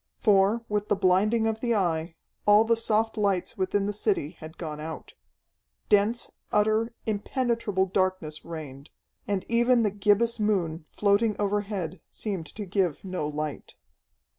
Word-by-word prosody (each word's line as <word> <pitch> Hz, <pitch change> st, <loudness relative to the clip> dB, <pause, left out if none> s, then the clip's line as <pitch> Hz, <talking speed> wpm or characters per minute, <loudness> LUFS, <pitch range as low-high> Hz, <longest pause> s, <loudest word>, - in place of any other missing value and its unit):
For, 210 Hz, +2 st, +3 dB
with 210 Hz, 0 st, -1 dB
the 205 Hz, -, +2 dB
blinding 200 Hz, +4 st, +3 dB
of 220 Hz, 0 st, 0 dB
the 235 Hz, -1 st, +1 dB
Eye, 165 Hz, -4 st, 0 dB, 0.3 s
all 210 Hz, +1 st, +7 dB
the 230 Hz, +1 st, +3 dB
soft 225 Hz, 0 st, 0 dB
lights 200 Hz, -3 st, 0 dB
within 195 Hz, 0 st, 0 dB
the 205 Hz, -, -1 dB
city 200 Hz, -7 st, 0 dB
had 160 Hz, -2 st, -12 dB
gone 155 Hz, -3 st, -5 dB
out. 160 Hz, +1 st, -7 dB, 0.8 s
Dense, 215 Hz, +3 st, +2 dB, 0.2 s
utter, 220 Hz, +2 st, +2 dB
impenetrable 220 Hz, -2 st, 0 dB
darkness 185 Hz, -5 st, -1 dB
reigned, 150 Hz, -4 st, -8 dB, 0.4 s
and 200 Hz, -2 st, -1 dB
even 235 Hz, +1 st, +3 dB
the 210 Hz, -, +1 dB
gibbous 210 Hz, +3 st, +2 dB
moon, 175 Hz, -7 st, 0 dB
floating 210 Hz, +1 st, +2 dB
overhead, 200 Hz, -4 st, -2 dB
seemed 190 Hz, -7 st, -4 dB
to 205 Hz, +7 st, -7 dB
give 185 Hz, -3 st, -1 dB
no 185 Hz, -5 st, -2 dB
light. 150 Hz, -1 st, -5 dB
200 Hz, 140 wpm, -27 LUFS, 180-220 Hz, 0.8 s, all